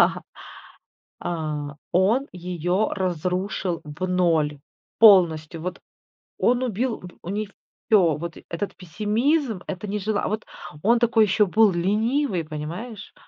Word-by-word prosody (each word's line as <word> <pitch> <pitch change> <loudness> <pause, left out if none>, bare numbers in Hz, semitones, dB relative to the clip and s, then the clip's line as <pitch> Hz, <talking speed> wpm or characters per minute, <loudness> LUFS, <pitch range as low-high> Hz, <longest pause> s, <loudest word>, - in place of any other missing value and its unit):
да, - - +3 1.0
а, 150 -3 -4 0.2
он 220 +10 +3
ее 180 +2 -1
разрушил 180 0 -2
в 150 +5 -5
0 165 -5 +1 0.4
полностью. 170 -7 +5
Вот. 180 +2 -5 0.6
Он 245 +1 +2
убил 240 0 -1
в 180 - -10 0.2
у 170 - -7
неё 205 +1 -2 0.4
всё. 180 -8 +5
Вот. 170 0 -6
Этот 170 +4 -4
пессимизм, 215 - 0
это 195 +2 -5
нежелание 205 +1 -1
А, - - 0
вот 215 +1 -3 0.4
он 235 +3 +4
такой 230 -2 +4
ещё 210 +1 +3
был 215 +2 +4
ленивый, 210 - 0
понимаешь? 170 +9 -7
185 Hz, 125 wpm, -24 LUFS, 170-215 Hz, 1.0 s, полностью